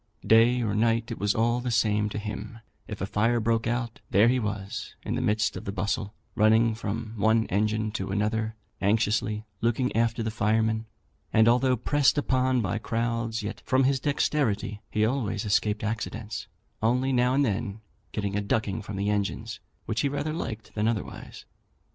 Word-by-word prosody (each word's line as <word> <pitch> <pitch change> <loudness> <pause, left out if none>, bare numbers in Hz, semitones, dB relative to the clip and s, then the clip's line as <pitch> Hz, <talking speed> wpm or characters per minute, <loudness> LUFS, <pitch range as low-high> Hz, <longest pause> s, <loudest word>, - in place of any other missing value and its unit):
Day 120 +2 +5
or 105 -3 0
night, 115 +2 +1
it 115 - -5
was 100 0 +1
all 120 +2 +2
the 125 0 -3
same 105 -2 +2
to 105 - -5
him; 105 +1 -5 0.3
if 105 - -7
a - - 0
fire 115 +4 +1
broke 115 +1 +1
out, 120 -1 -2
there 105 +5 +5
he 130 +1 +2
was 100 -3 -4
in - - -3
the - - -1
midst 105 0 +1
of - - -6
the 100 - -2
bustle, 100 +2 -2 0.2
running 110 +1 +4
from 110 0 -4
one 110 +2 +3
engine 110 +2 0
to 95 -3 -4
another, 110 +2 -1 0.3
anxiously 105 +1 +1 0.2
looking 120 +2 +1
after 115 0 +1
the 110 - -2
firemen; 110 +1 +1 0.4
and, 110 +1 +5
although 125 +2 +4
pressed 145 +5 +2
upon 130 -3 +2
by 100 +1 -1
crowds, 115 0 -2
yet, 105 - -5
from 130 +1 +2
his 135 0 +2
dexterity, 130 -8 0
he 110 0 +2
always 115 -3 -1
escaped 105 +1 +1
accidents, 110 -1 -4 0.3
only 125 +4 +2
now 125 +1 +3
and 140 +1 +3
then 105 -1 -2 0.3
getting 100 -2 -2
a 105 - +1
ducking 100 +1 -1
from 100 0 -7
the 100 +2 0
engines, 105 +2 -2 0.3
which 110 - -1
he 140 - +1
rather 145 +2 -2
liked 115 -9 -5
than 105 0 0
otherwise. 115 -3 -4
110 Hz, 180 wpm, -27 LUFS, 105-120 Hz, 0.4 s, Day